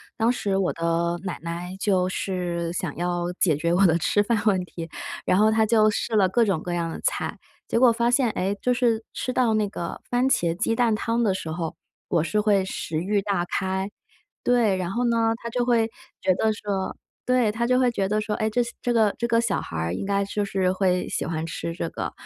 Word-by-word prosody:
当 225 Hz, +2 st, +2 dB
时 205 Hz, -5 st, -1 dB
我 190 Hz, -, +1 dB
的 170 Hz, +1 st, 0 dB
奶 185 Hz, -, -3 dB
奶， 170 Hz, +2 st, -5 dB
就 190 Hz, -2 st, +1 dB
是 175 Hz, -3 st, -2 dB
想 175 Hz, -3 st, -3 dB
要 175 Hz, 0 st, -1 dB
解 170 Hz, -5 st, +2 dB
决 170 Hz, +3 st, 0 dB
我 190 Hz, +3 st, +5 dB
的 165 Hz, -2 st, +4 dB
吃 205 Hz, +4 st, +2 dB
饭 220 Hz, 0 st, +1 dB
问 190 Hz, -4 st, +3 dB
题， 170 Hz, -2 st, -8 dB, 0.4 s
然 185 Hz, -, +3 dB
后 215 Hz, +2 st, +5 dB
她 220 Hz, 0 st, +3 dB
就 215 Hz, -1 st, +4 dB
试 220 Hz, +2 st, -2 dB
了 195 Hz, -3 st, +4 dB
各 230 Hz, +5 st, +3 dB
种 190 Hz, -6 st, 0 dB
各 175 Hz, -, -4 dB
样 170 Hz, -1 st, -1 dB
的 -, -, -6 dB
菜。 -, -, -1 dB, 0.3 s
结 -, -, 0 dB
果 245 Hz, 0 st, +6 dB
发 235 Hz, +1 st, +1 dB
现， 245 Hz, 0 st, +3 dB
诶， 195 Hz, 0 st, -1 dB
就 250 Hz, -, +2 dB
是 235 Hz, -2 st, +1 dB
吃 255 Hz, -, -3 dB
到 245 Hz, -3 st, +2 dB
那 215 Hz, -1 st, +1 dB
个 170 Hz, -4 st, -5 dB
番 245 Hz, +1 st, +2 dB
茄 170 Hz, -9 st, +1 dB
鸡 215 Hz, +5 st, 0 dB
蛋 230 Hz, -1 st, +2 dB
汤 230 Hz, +2 st, 0 dB
的 210 Hz, -5 st, +2 dB
时 165 Hz, -4 st, -5 dB
候， 160 Hz, 0 st, -4 dB, 0.3 s
我 170 Hz, -4 st, +1 dB
是 170 Hz, +6 st, 0 dB
会 205 Hz, -2 st, +3 dB
食 165 Hz, -4 st, -4 dB
欲 200 Hz, +4 st, 0 dB
大 195 Hz, -3 st, -1 dB
开， 190 Hz, +2 st, -2 dB, 0.5 s
对， 235 Hz, -6 st, +3 dB
然 180 Hz, -2 st, -2 dB
后 240 Hz, +5 st, -1 dB
呢， 230 Hz, -1 st, +2 dB
她 235 Hz, -, -3 dB
就 245 Hz, +1 st, 0 dB
会 230 Hz, -2 st, +2 dB, 0.3 s
觉 185 Hz, -, +3 dB
得 220 Hz, +4 st, +2 dB
说 200 Hz, -3 st, -3 dB, 0.3 s
对， 250 Hz, -3 st, +3 dB
她 225 Hz, +3 st, -1 dB
就 250 Hz, +1 st, +3 dB
会 255 Hz, -1 st, +4 dB
觉 195 Hz, -4 st, -1 dB
得 210 Hz, +1 st, +1 dB
说： 210 Hz, 0 st, -2 dB
“诶， 215 Hz, -, 0 dB
这 245 Hz, +3 st, +1 dB
些 235 Hz, 0 st, -3 dB
这 245 Hz, -, 0 dB
个 220 Hz, -3 st, +3 dB
这 235 Hz, -, -1 dB
个 230 Hz, -1 st, +3 dB
小 230 Hz, -4 st, 0 dB
孩 80 Hz, -, -6 dB
儿 80 Hz, +1 st, -1 dB
应 90 Hz, -, -3 dB
该 200 Hz, 0 st, +1 dB
就 205 Hz, +1 st, -2 dB
是 195 Hz, -2 st, 0 dB
会 185 Hz, -1 st, +1 dB
喜 -, -, -2 dB
欢 160 Hz, -1 st, -2 dB
吃 165 Hz, +1 st, -4 dB
这 170 Hz, -, -3 dB
个。” -, -, -4 dB
200 Hz, 250 characters per minute, -25 LUFS, 175-225 Hz, 0.5 s, 果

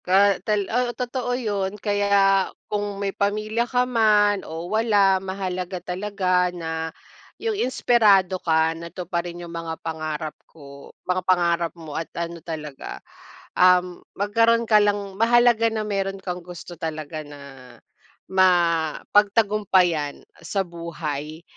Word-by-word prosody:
Ka 195 Hz, +1 st, +4 dB
tal 205 Hz, 0 st, 0 dB
ah, 250 Hz, 0 st, +1 dB
totoo 245 Hz, 0 st, -2 dB
yun, 205 Hz, -4 st, -2 dB
kaya 200 Hz, -2 st, +2 dB, 0.2 s
kung 205 Hz, -1 st, -3 dB
may 200 Hz, -1 st, -2 dB
pamilya 215 Hz, +3 st, -1 dB
ka 250 Hz, -1 st, +2 dB
man 210 Hz, -4 st, +3 dB
o 165 Hz, +1 st, -7 dB
wala, 200 Hz, -2 st, +3 dB
mahalaga 185 Hz, -1 st, -4 dB
talaga 180 Hz, 0 st, 0 dB
na 160 Hz, -2 st, -4 dB, 0.5 s
yung 450 Hz, -1 st, -2 dB
inspirado 210 Hz, -, +3 dB
ka 160 Hz, -1 st, +2 dB
na 170 Hz, +1 st, -8 dB
tuparin 175 Hz, -1 st, -5 dB
yung 170 Hz, -, -10 dB
mga 165 Hz, -1 st, -5 dB
pangarap 155 Hz, -1 st, -4 dB, 0.2 s
ko 140 Hz, -3 st, -13 dB, 0.2 s
mga 185 Hz, 0 st, 0 dB
pangarap 170 Hz, -2 st, +1 dB
mo 160 Hz, -3 st, -9 dB
at 160 Hz, +2 st, -4 dB
ano 170 Hz, 0 st, -4 dB
talaga, 150 Hz, -4 st, -7 dB, 0.6 s
um, 180 Hz, -1 st, +4 dB, 0.2 s
magkaroon 230 Hz, +3 st, +2 dB
ka 215 Hz, -2 st, +5 dB
lang 205 Hz, -1 st, 0 dB
mahalaga 235 Hz, -1 st, +4 dB
na 220 Hz, -1 st, -3 dB
meron 195 Hz, -1 st, -2 dB
kang 180 Hz, -1 st, -5 dB
gusto 175 Hz, 0 st, -10 dB
talaga 155 Hz, -1 st, -5 dB
na 145 Hz, -1 st, -12 dB, 0.9 s
mapagtagumpayan 185 Hz, -1 st, +2 dB, 0.2 s
sa 180 Hz, +4 st, -1 dB
buhay. 160 Hz, -3 st, -6 dB
185 Hz, 125 wpm, -23 LUFS, 170-205 Hz, 0.9 s, ka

